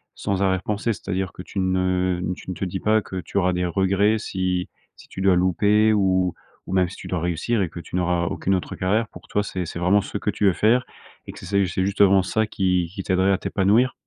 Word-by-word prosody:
sans 100 Hz, -1 st, -2 dB
arrière 95 Hz, -1 st, +1 dB
pensée? 105 Hz, +2 st, -1 dB
C'est-à-dire 95 Hz, 0 st, -3 dB
que 90 Hz, -, -10 dB
tu 100 Hz, -, -5 dB
ne 95 Hz, -1 st, +1 dB
n 90 Hz, -, -1 dB
tu -, -, -11 dB
ne 90 Hz, -, -3 dB
te 95 Hz, -, -3 dB
dis 95 Hz, +1 st, -4 dB
pas 110 Hz, +2 st, +2 dB
que 95 Hz, -1 st, -5 dB
tu 100 Hz, -, -6 dB
auras 90 Hz, -1 st, +2 dB
des 90 Hz, 0 st, -1 dB
regrets 100 Hz, +4 st, +2 dB
si 95 Hz, -4 st, -2 dB, 0.3 s
si -, -, -17 dB
tu 95 Hz, -, -7 dB
dois 95 Hz, -1 st, +4 dB
louper 105 Hz, +4 st, +3 dB
ou 95 Hz, -3 st, +2 dB, 0.3 s
ou -, -, -6 dB
même 90 Hz, -2 st, +2 dB
si -, -, -10 dB
tu -, -, -11 dB
dois 90 Hz, -, -2 dB
réussir 90 Hz, +7 st, -1 dB
et 90 Hz, -, -1 dB
que 85 Hz, -, -9 dB
tu 85 Hz, -, -8 dB
n'auras 90 Hz, -1 st, +1 dB
aucune 95 Hz, +3 st, 0 dB
autre 90 Hz, -, -4 dB
carrière? 105 Hz, +5 st, 0 dB
Pour -, -, -14 dB
toi, 105 Hz, -, 0 dB
c'est 95 Hz, -3 st, -4 dB
c'est 85 Hz, -, -7 dB
vraiment 90 Hz, +4 st, +3 dB
ce 105 Hz, -, -5 dB
que 105 Hz, -, -1 dB
tu 105 Hz, -, -1 dB
veux 95 Hz, -, +5 dB
faire 120 Hz, +6 st, +2 dB, 0.4 s
et -, -, -7 dB
que -, -, -12 dB
c -, -, -9 dB
c'est, 100 Hz, +1 st, +1 dB
c'est 95 Hz, +2 st, -1 dB
justement 100 Hz, -1 st, +4 dB
ça 110 Hz, +4 st, 0 dB
qui 90 Hz, -4 st, 0 dB
qui 95 Hz, -, -4 dB
t'aiderait 95 Hz, +1 st, +2 dB
à 95 Hz, -, +3 dB
t'épanouir? 110 Hz, +7 st, +2 dB
95 Hz, 250 wpm, -23 LUFS, 90-100 Hz, 0.4 s, veux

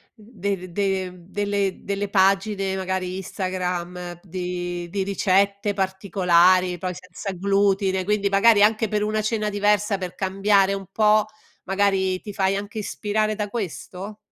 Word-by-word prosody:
de 200 Hz, -5 st, -5 dB
de 190 Hz, -1 st, -1 dB
mhmm, 180 Hz, -, -15 dB
delle 200 Hz, -1 st, -1 dB
delle 200 Hz, 0 st, -2 dB
pagine, 195 Hz, 0 st, +2 dB
magari 185 Hz, -1 st, -2 dB
Instagram, 180 Hz, -2 st, -4 dB
di 175 Hz, -1 st, -4 dB
di 195 Hz, +1 st, -1 dB
ricette 200 Hz, +1 st, +1 dB
particolari, 185 Hz, -2 st, +3 dB
poi 180 Hz, +1 st, -3 dB
senza 185 Hz, +2 st, -7 dB
glutine, 195 Hz, 0 st, +1 dB
quindi 205 Hz, 0 st, +1 dB
magari 205 Hz, +1 st, +5 dB
anche 220 Hz, +1 st, +3 dB
per 210 Hz, 0 st, -1 dB
una 215 Hz, 0 st, 0 dB
cena 215 Hz, -1 st, -1 dB
diversa, 205 Hz, 0 st, +1 dB
per 185 Hz, -2 st, -6 dB
cambiare 195 Hz, +1 st, +2 dB
un 195 Hz, 0 st, -5 dB
po', 215 Hz, -1 st, +4 dB, 0.4 s
magari 190 Hz, -1 st, +1 dB
ti 210 Hz, -, -7 dB
fai 195 Hz, -1 st, +1 dB
anche 205 Hz, +2 st, -5 dB
ispirare 215 Hz, +1 st, -1 dB
da 210 Hz, -1 st, -3 dB
questo? 195 Hz, -, -6 dB
195 Hz, 140 wpm, -23 LUFS, 185-205 Hz, 0.4 s, magari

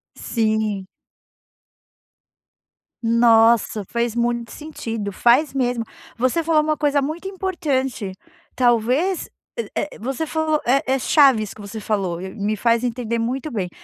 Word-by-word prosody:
Sim. 215 Hz, -4 st, -1 dB, 2.2 s
Nossa, 230 Hz, -2 st, +4 dB
fez 235 Hz, +3 st, -2 dB
muito 235 Hz, 0 st, -1 dB
sentido, 225 Hz, -9 st, -5 dB
faz 250 Hz, +8 st, +3 dB
mesmo. 245 Hz, -3 st, 0 dB, 0.3 s
Você 255 Hz, +7 st, +1 dB
falou 320 Hz, -1 st, +3 dB
uma 305 Hz, 0 st, 0 dB
coisa 290 Hz, -1 st, +2 dB
muito 315 Hz, +7 st, -4 dB
importante, 290 Hz, -, -2 dB, 0.4 s
talvez 250 Hz, -, +2 dB
é -, -, -47 dB, 0.4 s
é 300 Hz, -, -3 dB
você 270 Hz, +7 st, -3 dB
falou 315 Hz, -1 st, 0 dB
é 270 Hz, +3 st, +3 dB
é 270 Hz, -, +2 dB
chave 270 Hz, -4 st, +4 dB
isso 210 Hz, -, -7 dB
que 215 Hz, -, -12 dB
você 205 Hz, +2 st, -7 dB
falou 195 Hz, -5 st, -1 dB
e 190 Hz, +1 st, -7 dB
me 210 Hz, 0 st, -1 dB
faz 235 Hz, +2 st, +2 dB
entender 235 Hz, -1 st, -2 dB
muito 260 Hz, +6 st, -2 dB
bem 195 Hz, -6 st, -2 dB
240 Hz, 135 wpm, -21 LUFS, 220-290 Hz, 2.2 s, Nossa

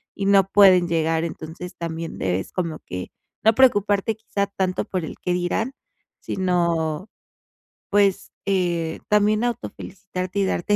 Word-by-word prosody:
y 200 Hz, -, -3 dB
no 195 Hz, -1 st, +5 dB
pueden 185 Hz, -4 st, +6 dB
llegar. 165 Hz, 0 st, +1 dB
Entonces, 165 Hz, +2 st, -7 dB
también 165 Hz, -1 st, -5 dB
debes 95 Hz, 0 st, -1 dB
como 165 Hz, -4 st, -2 dB
que 90 Hz, 0 st, -6 dB, 0.3 s
no 220 Hz, 0 st, +6 dB
preocuparte, 205 Hz, -4 st, +3 dB
quizá, 200 Hz, -2 st, -2 dB
tanto 190 Hz, -2 st, -1 dB
por 180 Hz, -4 st, -3 dB
el -, -, -7 dB
qué 180 Hz, -, 0 dB
dirán, 180 Hz, +8 st, -1 dB, 0.5 s
sino, 170 Hz, -1 st, 0 dB, 0.8 s
pues, 200 Hz, -2 st, +2 dB
eh, 175 Hz, -4 st, 0 dB
también 210 Hz, +2 st, +3 dB
autofelicitarte 195 Hz, -5 st, -4 dB
y 195 Hz, -, +3 dB
darte 190 Hz, +2 st, +1 dB
185 Hz, 135 wpm, -23 LUFS, 165-200 Hz, 0.8 s, pueden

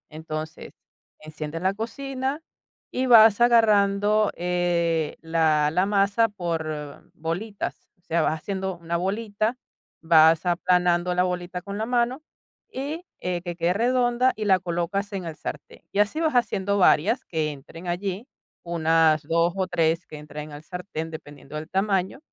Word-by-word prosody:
Entonces, 155 Hz, 0 st, -7 dB, 0.5 s
enciendes 155 Hz, +1 st, -7 dB
la 190 Hz, +1 st, +1 dB
cocina 265 Hz, +6 st, -4 dB, 0.5 s
y 255 Hz, -, -1 dB
vas 225 Hz, -3 st, +7 dB
agarrando, 210 Hz, -3 st, +4 dB
eh, 170 Hz, -3 st, 0 dB
la 160 Hz, -2 st, +2 dB
la 180 Hz, +4 st, +2 dB
masa 205 Hz, +2 st, +2 dB
por 160 Hz, -6 st, -5 dB
bolitas, 180 Hz, +6 st, -5 dB
o -, -, -37 dB
sea, 170 Hz, -2 st, 0 dB
vas -, -, +1 dB
haciendo 190 Hz, -1 st, -3 dB
una 170 Hz, 0 st, -3 dB
bolita, 215 Hz, +5 st, -1 dB, 0.4 s
vas 160 Hz, 0 st, +5 dB
aplanando 180 Hz, 0 st, +2 dB
la 180 Hz, -, +3 dB
bolita 180 Hz, 0 st, -3 dB
con 200 Hz, +2 st, -6 dB
la 220 Hz, -, -1 dB
mano 245 Hz, +3 st, 0 dB, 0.5 s
y, 295 Hz, +7 st, -5 dB
eh, 180 Hz, -1 st, -2 dB
que 175 Hz, -1 st, -5 dB
quede 170 Hz, +1 st, +1 dB
redonda 245 Hz, +3 st, +2 dB
y 215 Hz, -, -4 dB
la 190 Hz, -2 st, +4 dB
colocas 180 Hz, +4 st, -2 dB
en 195 Hz, -2 st, -3 dB
el 165 Hz, -2 st, -6 dB
sartén. -, -, -8 dB
Y 200 Hz, -, 0 dB
así 210 Hz, +9 st, +2 dB
vas 320 Hz, -3 st, +1 dB
haciendo 205 Hz, -4 st, +1 dB
varias 205 Hz, -, +3 dB
que 155 Hz, -2 st, -1 dB
entren 155 Hz, +5 st, -11 dB
allí, 190 Hz, +6 st, -3 dB, 0.4 s
unas 160 Hz, -2 st, +2 dB
2 170 Hz, +3 st, +1 dB
o 190 Hz, -1 st, 0 dB
3 165 Hz, -1 st, +1 dB
que 155 Hz, -, -10 dB
entren 150 Hz, 0 st, -8 dB
en 145 Hz, -, -8 dB
el 150 Hz, -, -14 dB
sartén, 180 Hz, -2 st, -6 dB
dependiendo 145 Hz, -2 st, -10 dB
del 155 Hz, +2 st, -6 dB
tamaño, 195 Hz, +3 st, 0 dB
180 Hz, 155 wpm, -25 LUFS, 165-210 Hz, 0.5 s, vas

